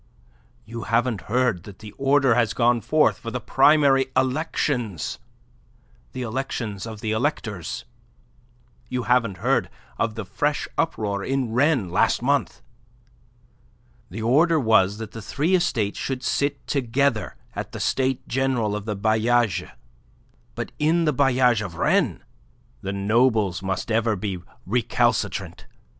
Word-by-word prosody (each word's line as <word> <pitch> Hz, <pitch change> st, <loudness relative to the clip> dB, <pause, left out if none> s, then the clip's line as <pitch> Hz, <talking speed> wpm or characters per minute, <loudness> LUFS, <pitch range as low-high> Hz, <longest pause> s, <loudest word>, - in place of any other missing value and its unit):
You 115 Hz, +1 st, -7 dB
haven't 115 Hz, -3 st, +1 dB
heard 125 Hz, -5 st, +1 dB
that 100 Hz, -3 st, -11 dB
the 110 Hz, -1 st, -10 dB
order 135 Hz, -1 st, +3 dB
has 115 Hz, -3 st, +1 dB
gone 120 Hz, -1 st, +3 dB
forth 150 Hz, +8 st, +2 dB
for 115 Hz, -, -6 dB
the 125 Hz, -, -3 dB
primary 135 Hz, 0 st, +4 dB
elections 130 Hz, -, -1 dB, 0.9 s
the 130 Hz, -, -4 dB
elections 115 Hz, -4 st, -4 dB
of 110 Hz, -1 st, -8 dB
the 110 Hz, -, -2 dB
electors. 110 Hz, -, -2 dB, 1.0 s
You 125 Hz, -1 st, -2 dB
haven't 120 Hz, -5 st, +1 dB
heard -, -, +1 dB, 0.3 s
of 115 Hz, -2 st, 0 dB
the 110 Hz, -3 st, -5 dB
fresh 145 Hz, +10 st, -1 dB
uproar 105 Hz, -11 st, -1 dB
in 135 Hz, -2 st, -1 dB
Rennes, 130 Hz, -, +2 dB
last -, -, +2 dB
month. -, -, 0 dB, 1.5 s
The 110 Hz, +5 st, -6 dB
order 155 Hz, +8 st, +4 dB
was 110 Hz, -5 st, +3 dB
that 110 Hz, -2 st, -7 dB
the 115 Hz, -, -8 dB
three 150 Hz, -, -1 dB
estates 125 Hz, -, +1 dB
should 130 Hz, -1 st, -3 dB
sit 140 Hz, +2 st, -1 dB
together 135 Hz, -3 st, 0 dB, 0.2 s
at -, -, -5 dB
the -, -, -7 dB
States 130 Hz, -1 st, 0 dB
General 125 Hz, -5 st, 0 dB
of 105 Hz, -1 st, -5 dB
the 105 Hz, -2 st, -3 dB
bailliages, 110 Hz, 0 st, +1 dB, 0.9 s
but -, -, -5 dB
in 165 Hz, +3 st, +2 dB
the 150 Hz, -, +2 dB
bailliage 125 Hz, -4 st, +3 dB
of 90 Hz, -5 st, -7 dB
Rennes -, -, +1 dB, 0.6 s
the 95 Hz, -, -3 dB
nobles 105 Hz, -2 st, +2 dB
must 95 Hz, +3 st, -3 dB
ever 110 Hz, 0 st, +2 dB
be 95 Hz, -1 st, -4 dB, 0.3 s
recalcitrant. 120 Hz, +5 st, 0 dB
120 Hz, 135 wpm, -24 LUFS, 105-135 Hz, 1.5 s, primary